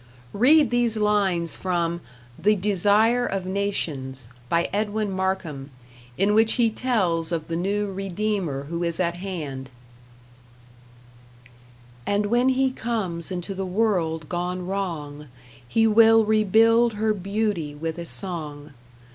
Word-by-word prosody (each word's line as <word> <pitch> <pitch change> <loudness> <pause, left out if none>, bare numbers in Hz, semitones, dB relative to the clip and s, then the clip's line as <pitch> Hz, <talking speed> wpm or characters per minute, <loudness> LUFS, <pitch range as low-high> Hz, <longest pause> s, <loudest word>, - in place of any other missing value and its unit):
Read 270 +4 +5
these 240 -2 +1
lines 200 -5 +1
from 170 -2 -2 0.4
"The 210 +2 +3
Desire 210 +5 +2
of 195 -5 -2
Nations," 150 - -2 0.2
by 170 0 +1
Edwin 210 0 -1
Markham, 185 -7 -3 0.5
in 200 +2 +2
which 220 +1 +4
he 235 -3 +2
tells 185 -9 0
of 165 -2 -3
the 165 - -3
new 200 +3 -1
Redeemer 195 -6 -2
who 170 +4 -4
is 170 -1 -1
at 175 -1 0
hand: 150 -9 -6 2.4
And 205 +1 +1
when 240 +4 +2
he 265 0 +2
comes 215 -9 -3
into 180 +2 -4
the 190 0 -4
world 180 -6 0
gone 180 +1 -3
wrong, 160 -7 -4 0.4
He 225 - +2
will 225 0 +6
rebuild 225 +2 +4
her 215 +1 0
beauty 200 -6 -2
with 160 +2 -4
a 170 - -5
song. 150 -7 -3
195 Hz, 125 wpm, -24 LUFS, 170-215 Hz, 2.4 s, will